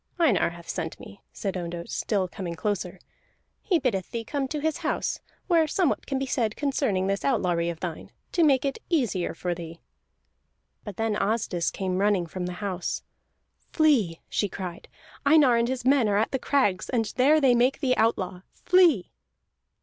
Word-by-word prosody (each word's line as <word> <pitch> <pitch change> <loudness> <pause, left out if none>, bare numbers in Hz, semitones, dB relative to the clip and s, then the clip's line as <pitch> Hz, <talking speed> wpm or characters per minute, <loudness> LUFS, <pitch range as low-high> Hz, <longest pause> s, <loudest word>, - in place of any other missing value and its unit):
"Einar 295 - +3
hath 170 0 -12
sent 165 -3 -4
me," 200 - -12
said 195 -2 -4
Ondott, 170 -1 -5
still 195 -4 0
coming 175 -2 -6
closer. 190 -1 -2 0.6
"He 365 - +2
biddeth 235 - -1
thee 230 -1 -4
come 275 +3 -2
to 300 +3 -3
his 315 0 -1
house, - - -2 0.3
where 335 -4 +3
somewhat 345 0 0
can 270 - -1
be 270 - -1
said 230 -4 -1
concerning 270 -10 0
this 195 0 -1
outlawry 175 -10 +1
of 165 -1 -6
thine, 170 -3 -5 0.2
to 345 - +2
make 275 -3 +4
it 275 - -2
easier 245 - 0
for 180 -1 -2
thee." 170 -1 -8 1.0
But 205 -4 -8
then 225 -1 0
Asdis 200 -5 0
came 185 -1 -2
running 200 -3 +2
from 180 +2 -5
the 180 - -4
house. 185 -3 -3 0.7
"Flee!" 250 - +2
she 205 - -1
cried. 180 -2 -7 0.4
"Einar 285 -4 +5
and 235 0 +2
his 255 -1 -3
men 260 -5 +4
are 200 - +2
at 220 - +1
the 265 - -1
crags, 205 -10 +1
and 225 -4 -1
there 290 +5 +5
they 265 -4 +4
make 245 +3 +2
thee 265 -4 +2
outlaw. 190 -5 0
Flee!" 345 - +3
215 Hz, 175 wpm, -26 LUFS, 185-270 Hz, 1.0 s, Einar